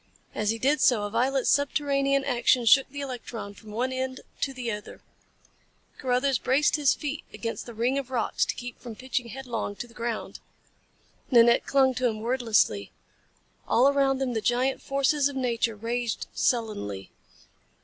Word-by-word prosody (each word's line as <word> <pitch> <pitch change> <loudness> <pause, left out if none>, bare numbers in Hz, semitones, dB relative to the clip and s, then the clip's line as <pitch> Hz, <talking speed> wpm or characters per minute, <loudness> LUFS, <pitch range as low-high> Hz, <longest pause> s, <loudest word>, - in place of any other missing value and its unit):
As 210 -1 -1
he 225 - +1
did 275 +4 +1
so, 245 -5 +4
a 205 - -4
violent 260 +4 +1
subterranean 275 -1 +2
action 245 -1 +2
shook 270 +4 +6
the 285 +1 -6
electron 240 -6 -6
from 215 +1 -15
one 245 +5 -2
end 260 0 -3 0.2
to 275 - 0
the 250 -3 -4
other. 210 -1 -8 1.0
Carruthers 255 0 +1
braced 280 +4 +2
his 295 -3 +3
feet 295 0 -5
against 230 +1 -5
the 235 - -8
ring 245 +5 +1
of 265 -2 -7
rocks 245 -4 0
to - - -3
keep 245 -1 -8
from 235 -3 -8
pitching 255 0 -3
headlong 235 -4 -5
to 240 - -6
the 230 - -19
ground. 230 -1 -4 0.9
Nanette 235 -2 +5
clung 265 -1 +4
to 255 0 +1
him 215 -2 -3
wordlessly. 225 - +1 0.8
All 250 +4 +4
around 275 -1 +2
them 260 -2 -2
the 220 - -1
giant 250 +4 +1
forces 275 +1 +1
of 280 - -8
nature 235 -3 0
raged 230 +2 -3
sullenly. 105 - -1
250 Hz, 165 wpm, -27 LUFS, 230-270 Hz, 1.0 s, shook